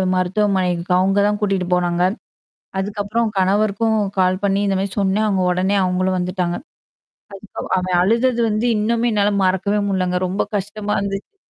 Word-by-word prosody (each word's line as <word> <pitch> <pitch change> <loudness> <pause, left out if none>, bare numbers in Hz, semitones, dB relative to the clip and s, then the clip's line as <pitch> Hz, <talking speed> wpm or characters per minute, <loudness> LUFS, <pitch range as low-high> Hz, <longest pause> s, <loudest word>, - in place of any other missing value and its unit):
மருத்துவமனைக்கு 185 -2 0
அவங்க 195 +2 +2
தான் 210 0 -1
கூட்டிட்டு 195 -3 0
போனாங்க. 175 0 +1 0.8
அதுக்கப்புறம் 205 +3 -1
கணவருக்கும் 210 +3 +1 0.2
கால் 185 +1 +2
பண்ணி 200 0 +2
இந்த 195 -1 +1
மாதிரி 195 +1 -3
சொன்னேன், 200 +2 +1
அவங்க 190 -3 +1
உடனே 190 +3 +1
அவங்களும் 185 +1 0
வந்துட்டாங்க. 180 -1 -2 0.8
அதுக்கப்புறம் 195 +1 -8
அவன் 180 -1 0
அழுதது 235 +4 +2
வந்து 215 +3 0
இன்னுமே 230 +3 +1
என்னால 205 0 +2
மறக்கவே 190 +3 +1
முடியலங்க, 185 -2 0
ரொம்ப 190 +3 -1 0.2
கஷ்டமா 210 +1 -3
இருந்துச்சு. 200 - -5
195 Hz, 140 wpm, -20 LUFS, 185-210 Hz, 0.8 s, அவங்க